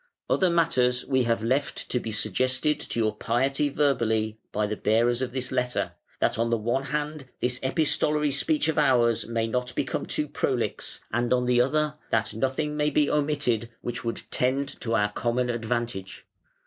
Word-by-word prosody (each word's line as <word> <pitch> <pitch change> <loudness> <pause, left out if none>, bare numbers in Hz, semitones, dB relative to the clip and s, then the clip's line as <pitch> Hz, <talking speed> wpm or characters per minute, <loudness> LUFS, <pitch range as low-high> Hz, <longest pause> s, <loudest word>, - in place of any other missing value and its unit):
"Other 185 - +3
matters 130 -8 +2
we 130 -2 +2
have 115 -1 0
left 135 +4 -1
to 125 - +2
be 115 - -5
suggested 130 +8 +1
to - - -4
your 110 -2 +2
Piety 135 +6 +1
verbally 115 -7 +1
by 105 0 0
the 105 +1 -2
bearers 115 +4 +2
of 130 -1 -2
this 130 0 -3
letter, 125 0 0 0.3
that - - +1
on 115 0 +1
the 115 - +2
one 120 +5 -1
hand 150 -2 -3
this 125 0 0
epistolary 150 +1 +1
speech 150 +2 +1
of 160 -1 +1
ours 120 -6 +3
may 115 -1 0
not 125 +2 -2
become - - -2
too - - -1
prolix, - - -2
and 120 0 0
on 125 0 +3
the 125 0 +4
other 150 +3 +1 0.2
that 110 -1 0
nothing 135 +6 -1
may 150 0 +2
be 150 0 +2
omitted 140 -6 0
which 120 0 -4
would 115 0 -3
tend 135 +2 +1
to 115 -2 0
our 105 -1 +2
common 120 +3 0
advantage". 115 -4 -3
125 Hz, 175 wpm, -26 LUFS, 115-140 Hz, 0.3 s, the